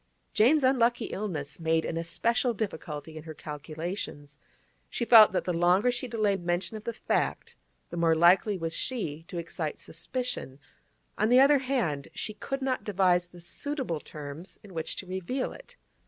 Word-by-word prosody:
Jane's 270 Hz, +7 st, +4 dB
unlucky 245 Hz, -2 st, +3 dB
illness 155 Hz, -8 st, -4 dB
made 160 Hz, 0 st, +1 dB
an 165 Hz, -, -3 dB
especial 230 Hz, +9 st, 0 dB
difficulty 160 Hz, -7 st, -5 dB
in 155 Hz, -, -8 dB
her 160 Hz, -1 st, -8 dB
calculations. 150 Hz, -1 st, -6 dB, 0.5 s
She -, -, -2 dB
felt 225 Hz, -4 st, +9 dB
that 185 Hz, -, 0 dB
the 180 Hz, -, -1 dB
longer 180 Hz, +7 st, +3 dB
she 245 Hz, +1 st, -2 dB
delayed 210 Hz, -5 st, 0 dB
mention 175 Hz, +5 st, -1 dB
of 215 Hz, -, -8 dB
the 235 Hz, -, -2 dB
fact, -, -, -1 dB, 0.4 s
the 175 Hz, -, -5 dB
more 165 Hz, -1 st, +3 dB
likely 180 Hz, +5 st, +5 dB
was 165 Hz, -1 st, -3 dB
she 165 Hz, -, -3 dB
to 180 Hz, -, -7 dB
excite 165 Hz, -2 st, -4 dB
suspicion; 170 Hz, -, -5 dB, 0.6 s
on 215 Hz, -, +3 dB
the 250 Hz, +1 st, +7 dB
other 280 Hz, +1 st, +6 dB
hand, 235 Hz, -, -1 dB
she 215 Hz, -, -3 dB
could 270 Hz, +6 st, -4 dB
not 260 Hz, -1 st, -1 dB
devise 180 Hz, -3 st, +2 dB
the 175 Hz, 0 st, -15 dB
suitable 250 Hz, -, -3 dB
terms 150 Hz, +4 st, -8 dB
in 200 Hz, -3 st, -13 dB
which 160 Hz, -1 st, -2 dB
to -, -, -5 dB
reveal 190 Hz, +8 st, -3 dB
it. -, -, -13 dB
185 Hz, 170 wpm, -28 LUFS, 165-235 Hz, 0.6 s, felt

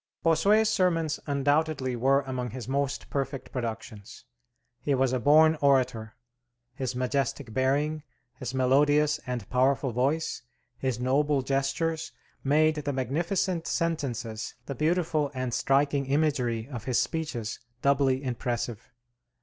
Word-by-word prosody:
Bossuet's 200 Hz, +7 st, +4 dB
sermons 165 Hz, -6 st, +1 dB
undoubtedly 145 Hz, -2 st, +1 dB
were 135 Hz, +4 st, +3 dB
among 130 Hz, -2 st, -4 dB
his 125 Hz, +1 st, -7 dB
most 140 Hz, +1 st, -1 dB
perfect 135 Hz, -2 st, -3 dB
productions. 115 Hz, -2 st, -6 dB, 0.6 s
He 145 Hz, -, +1 dB
was 130 Hz, -1 st, +1 dB
a 130 Hz, -, +1 dB
born 155 Hz, +4 st, +5 dB
orator; 125 Hz, -6 st, +2 dB, 0.6 s
his 130 Hz, -1 st, -3 dB
majestic 125 Hz, -3 st, -2 dB
bearing, 145 Hz, +5 st, +1 dB, 0.4 s
his 125 Hz, -1 st, -4 dB
melodious 145 Hz, +3 st, +3 dB
and 125 Hz, -2 st, -4 dB
powerful 130 Hz, +1 st, +2 dB
voice, 140 Hz, +7 st, 0 dB, 0.4 s
his 130 Hz, -2 st, -1 dB
noble 140 Hz, +2 st, +1 dB
gestures, 140 Hz, +5 st, -1 dB, 0.3 s
made 155 Hz, +3 st, +3 dB
the 145 Hz, -1 st, -2 dB
magnificent 165 Hz, -, -1 dB
sentences, 125 Hz, -10 st, -2 dB
the 140 Hz, -, -4 dB
beautiful 155 Hz, 0 st, +1 dB
and 130 Hz, -2 st, -2 dB
striking 140 Hz, 0 st, +1 dB
imagery 135 Hz, -6 st, 0 dB
of 120 Hz, -5 st, -7 dB
his 130 Hz, -2 st, +1 dB
speeches, 135 Hz, -9 st, -3 dB, 0.2 s
doubly 140 Hz, -1 st, +2 dB
impressive. 120 Hz, -3 st, -3 dB
135 Hz, 120 wpm, -28 LUFS, 125-150 Hz, 0.6 s, born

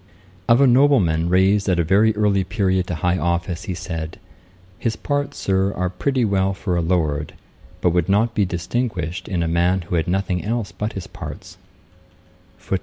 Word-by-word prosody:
Of 115 Hz, +2 st, +6 dB
a -, -, +7 dB
nobleman 120 Hz, -, +4 dB
raised 95 Hz, +3 st, +3 dB
at 90 Hz, -, +2 dB
a 85 Hz, -, +2 dB
very 105 Hz, +6 st, +3 dB
early 105 Hz, -2 st, +2 dB
period 95 Hz, -1 st, 0 dB
to 90 Hz, -, -3 dB
high 90 Hz, +3 st, 0 dB
office, 85 Hz, +3 st, -2 dB
he 95 Hz, -4 st, -3 dB
said, 80 Hz, -2 st, -6 dB, 0.6 s
'His 115 Hz, -2 st, -1 dB
parts, 145 Hz, 0 st, -2 dB
Sir, 95 Hz, 0 st, +1 dB
are 90 Hz, 0 st, -1 dB
pretty 130 Hz, +4 st, 0 dB
well 95 Hz, -1 st, +1 dB
for 95 Hz, -2 st, -2 dB
a 85 Hz, -, +1 dB
Lord; 80 Hz, -4 st, -1 dB, 0.5 s
but 90 Hz, -, +3 dB
would 90 Hz, +1 st, 0 dB
not 110 Hz, +4 st, +2 dB
be 105 Hz, -, +2 dB
distinguished 90 Hz, -1 st, -3 dB
in 90 Hz, -3 st, -1 dB
a -, -, -1 dB
man 85 Hz, +3 st, +2 dB
who 85 Hz, +1 st, -4 dB
had 80 Hz, -, -1 dB
nothing 90 Hz, -1 st, -1 dB
else 110 Hz, -3 st, -2 dB
but 105 Hz, +5 st, -4 dB
his 95 Hz, -3 st, -6 dB
parts'. -, -, -9 dB
95 Hz, 180 wpm, -21 LUFS, 85-105 Hz, 0.6 s, a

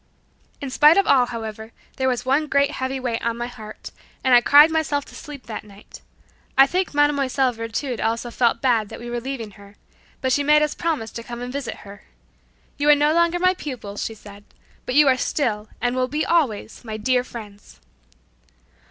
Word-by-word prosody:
In 275 Hz, -2 st, -5 dB
spite 300 Hz, +6 st, +6 dB
of 395 Hz, -, +4 dB
all, 255 Hz, -3 st, +4 dB
however, 220 Hz, -1 st, -7 dB, 0.2 s
there 260 Hz, -, 0 dB
was 250 Hz, -1 st, -1 dB
one 280 Hz, +4 st, +1 dB
great 280 Hz, 0 st, +2 dB
heavy 265 Hz, -2 st, -3 dB
weight 240 Hz, -3 st, -3 dB
on 235 Hz, 0 st, -1 dB
my 240 Hz, -, -3 dB
heart, 220 Hz, -3 st, -10 dB, 0.3 s
and 260 Hz, -, +3 dB
I 240 Hz, -, +8 dB
cried 295 Hz, +5 st, +7 dB
myself 300 Hz, -3 st, 0 dB
to -, -, -15 dB
sleep 285 Hz, -3 st, -10 dB
that 220 Hz, -3 st, -6 dB
night 205 Hz, -1 st, -15 dB, 0.6 s
I 270 Hz, -, +9 dB
think 365 Hz, +4 st, -1 dB
Mlle. 290 Hz, -2 st, +2 dB, 0.2 s
Virtud 230 Hz, +2 st, -4 dB
also 230 Hz, +2 st, -2 dB
felt 235 Hz, -1 st, +1 dB
badly 230 Hz, -5 st, +2 dB
that -, -, -10 dB
we 240 Hz, 0 st, -7 dB
were 240 Hz, -, -2 dB
leaving 245 Hz, -4 st, -5 dB
her, 200 Hz, 0 st, -16 dB, 0.4 s
but 260 Hz, -, -1 dB
she 285 Hz, -, +2 dB
made 300 Hz, +1 st, +4 dB
us 300 Hz, -, -1 dB
promise 310 Hz, -10 st, -2 dB
to 230 Hz, -, -7 dB
come 240 Hz, 0 st, -8 dB
and 245 Hz, +1 st, -6 dB
visit 280 Hz, -3 st, -4 dB
her. 200 Hz, 0 st, -12 dB, 0.8 s
"You 290 Hz, +1 st, +2 dB
are 295 Hz, -, +8 dB
no 295 Hz, +1 st, +2 dB
longer 340 Hz, +1 st, +2 dB
my 365 Hz, +1 st, +3 dB
pupils," 245 Hz, -, -6 dB
she 225 Hz, -, -5 dB
said, 205 Hz, -1 st, -14 dB, 0.4 s
"but 250 Hz, -, -2 dB
you 295 Hz, 0 st, +6 dB
are 260 Hz, -1 st, +4 dB
still, 220 Hz, -6 st, -2 dB
and 245 Hz, +1 st, -1 dB
will 255 Hz, 0 st, 0 dB
be 300 Hz, +3 st, -2 dB
always, 265 Hz, -11 st, 0 dB
my 220 Hz, -2 st, -6 dB
dear 250 Hz, +3 st, +1 dB
friends." 210 Hz, -5 st, -11 dB
255 Hz, 200 wpm, -22 LUFS, 225-290 Hz, 0.8 s, I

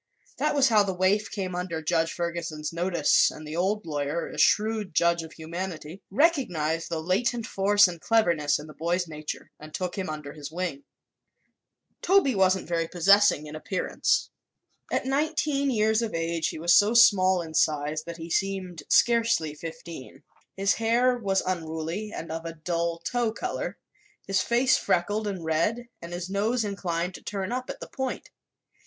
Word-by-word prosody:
That -, -, 0 dB
was 275 Hz, -2 st, +4 dB
how 215 Hz, -2 st, +5 dB
the 195 Hz, -2 st, -1 dB
waif 190 Hz, +3 st, +2 dB
came 190 Hz, -3 st, -4 dB
under 175 Hz, -2 st, -3 dB
Judge 165 Hz, +1 st, 0 dB
Ferguson's 170 Hz, -3 st, -4 dB
notice 170 Hz, -3 st, +3 dB
and 155 Hz, -, -10 dB
the 155 Hz, -, -6 dB
old 200 Hz, +5 st, 0 dB
lawyer, 150 Hz, +1 st, -2 dB
a -, -, -7 dB
shrewd 215 Hz, -4 st, +2 dB
judge 170 Hz, 0 st, +3 dB
of 160 Hz, -1 st, -10 dB
humanity, 170 Hz, +1 st, -6 dB
recognized 185 Hz, -, +1 dB
the 165 Hz, -2 st, -2 dB
latent 220 Hz, +8 st, 0 dB
force 205 Hz, 0 st, +4 dB
and 170 Hz, -2 st, -7 dB
cleverness 170 Hz, -10 st, +2 dB
in 150 Hz, -, -9 dB
the 155 Hz, -, -12 dB
boy's 175 Hz, +3 st, -1 dB
nature 155 Hz, -1 st, -7 dB
and 155 Hz, 0 st, -10 dB
took 180 Hz, -1 st, -3 dB
him 185 Hz, -, -3 dB
under 150 Hz, -2 st, -6 dB
his 150 Hz, -1 st, -8 dB
wing. 165 Hz, -5 st, -4 dB, 1.2 s
Toby 375 Hz, -9 st, +4 dB
wasn't 190 Hz, -2 st, +2 dB
very 165 Hz, -1 st, -1 dB
prepossessing 190 Hz, -1 st, +4 dB
in 150 Hz, 0 st, -8 dB
appearance. 180 Hz, +4 st, -1 dB, 0.6 s
At -, -, 0 dB
nineteen 280 Hz, 0 st, 0 dB
years 220 Hz, -2 st, +2 dB
of 225 Hz, -6 st, -3 dB
age 165 Hz, -1 st, -1 dB
he -, -, -5 dB
was 170 Hz, +2 st, +3 dB
so 210 Hz, +3 st, +5 dB
small 190 Hz, -6 st, +5 dB
in 160 Hz, -1 st, -9 dB
size 150 Hz, 0 st, +1 dB
that 170 Hz, 0 st, -7 dB
he 165 Hz, 0 st, -8 dB
seemed 190 Hz, -4 st, -2 dB
scarcely 230 Hz, -10 st, +3 dB
fifteen. 160 Hz, -3 st, -9 dB, 0.3 s
His 195 Hz, +1 st, +2 dB
hair 240 Hz, +3 st, +2 dB
was 195 Hz, -5 st, 0 dB
unruly 170 Hz, +3 st, -3 dB
and 165 Hz, -5 st, -6 dB
of 165 Hz, 0 st, -4 dB
a 165 Hz, 0 st, -5 dB
dull 170 Hz, +1 st, -2 dB
tow 235 Hz, +6 st, -1 dB
color, 225 Hz, -, -4 dB, 0.5 s
his 195 Hz, -1 st, +1 dB
face 245 Hz, +3 st, +3 dB
freckled 205 Hz, +5 st, 0 dB
and 190 Hz, -5 st, -4 dB
red 210 Hz, +10 st, 0 dB
and 170 Hz, -, -8 dB
his 175 Hz, +1 st, -4 dB
nose 215 Hz, +4 st, 0 dB
inclined 180 Hz, -3 st, -2 dB
to -, -, -10 dB
turn 195 Hz, -1 st, -4 dB
up 255 Hz, +1 st, -3 dB
at -, -, -6 dB
the -, -, -8 dB
point. 265 Hz, -1 st, -5 dB
180 Hz, 170 wpm, -26 LUFS, 165-210 Hz, 1.2 s, how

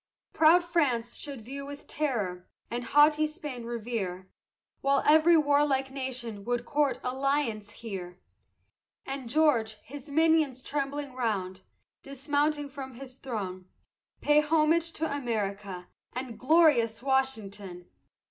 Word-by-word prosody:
Proud 330 Hz, +3 st, +6 dB
France 270 Hz, -9 st, 0 dB
should 275 Hz, -6 st, -5 dB
view 275 Hz, +4 st, -7 dB
with 285 Hz, +1 st, -9 dB
terror, 210 Hz, -12 st, -2 dB, 0.2 s
and 240 Hz, +1 st, -2 dB
haughty 300 Hz, +4 st, +5 dB
Spain 295 Hz, -7 st, -7 dB
revere, 215 Hz, -6 st, -4 dB, 0.5 s
While 275 Hz, 0 st, +2 dB
every 315 Hz, +3 st, +6 dB
warlike 285 Hz, -3 st, +2 dB
nation 250 Hz, -6 st, -5 dB
would 245 Hz, 0 st, -1 dB
court 280 Hz, -2 st, +1 dB
alliance 260 Hz, -5 st, -1 dB
here; 185 Hz, -6 st, -7 dB, 0.9 s
And 270 Hz, -3 st, -5 dB
George, 255 Hz, -6 st, +3 dB
his 285 Hz, +3 st, -10 dB
minions 310 Hz, -4 st, +2 dB
trembling 285 Hz, -1 st, -3 dB
round, 195 Hz, -7 st, -2 dB, 0.4 s
dismounting 290 Hz, +2 st, -1 dB
from 265 Hz, -2 st, -8 dB
his 255 Hz, 0 st, -9 dB
throne 190 Hz, -8 st, -5 dB, 0.5 s
Pay 295 Hz, 0 st, +5 dB
homage 320 Hz, +2 st, +2 dB
to 315 Hz, -2 st, -2 dB
America 200 Hz, -7 st, -3 dB, 0.3 s
and 250 Hz, -2 st, -6 dB
glorious 255 Hz, -7 st, +4 dB
Washington! 210 Hz, -9 st, -2 dB
265 Hz, 115 wpm, -29 LUFS, 225-295 Hz, 0.9 s, Proud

